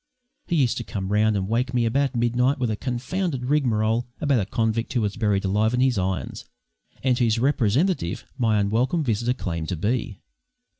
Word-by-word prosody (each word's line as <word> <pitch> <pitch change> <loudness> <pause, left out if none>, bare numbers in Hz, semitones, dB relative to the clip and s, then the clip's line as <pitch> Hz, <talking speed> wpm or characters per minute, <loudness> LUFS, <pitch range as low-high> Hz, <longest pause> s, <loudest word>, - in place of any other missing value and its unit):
He 175 - 0
used 130 -7 +2
to 120 - -3
come 95 -3 -5
round 105 0 +3
and 95 -1 -2
wake 125 +4 -1
me 120 -1 +2
about 135 +3 +1
midnight 120 +3 +2
with 125 -4 -1
a - - -1
confounded 130 - -3
rigmarole 120 -5 +1
about 145 -6 +2
a 100 - -2
convict 115 0 -1
who 120 - +1
was 105 -2 -1
buried 105 -4 0
alive 105 +4 +1
in - - 0
his 130 -5 +2
irons, 95 0 -3 0.6
and 130 -2 +3
whose 115 -2 +2
representative 130 - +1
my 115 -5 +2
unwelcome 120 +11 +1
visitor 120 0 0
claimed 85 -7 -4
to 90 - -1
be. 110 +3 -2
120 Hz, 185 wpm, -24 LUFS, 105-130 Hz, 0.6 s, round